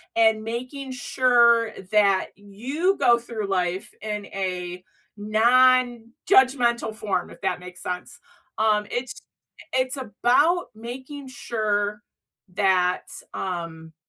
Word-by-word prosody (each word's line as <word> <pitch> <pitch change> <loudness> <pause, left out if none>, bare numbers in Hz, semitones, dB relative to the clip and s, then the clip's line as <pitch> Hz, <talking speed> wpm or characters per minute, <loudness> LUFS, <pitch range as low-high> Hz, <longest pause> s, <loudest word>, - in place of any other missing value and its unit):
and 220 -1 +3
making 255 +4 -5
sure 235 -2 +3 0.2
that 200 -3 +3
you 260 - -2
go 240 -1 +5
through 225 -3 -5
life 185 -1 -2
in 210 -1 -4
a 180 -2 -4 0.4
nonjudgmental 240 - +3
form, 190 -5 -2
if - - -14
that - - -1
makes 180 0 -11
sense. 180 0 -5 0.4
Um, 215 -1 +2
it's 245 +1 -4 0.5
it's 260 +1 0
about 265 - +2
making 260 +5 -8
sure 210 -4 -2 0.5
that, 185 -2 +2 0.3
um, 165 -3 -5
220 Hz, 100 wpm, -24 LUFS, 195-255 Hz, 0.5 s, go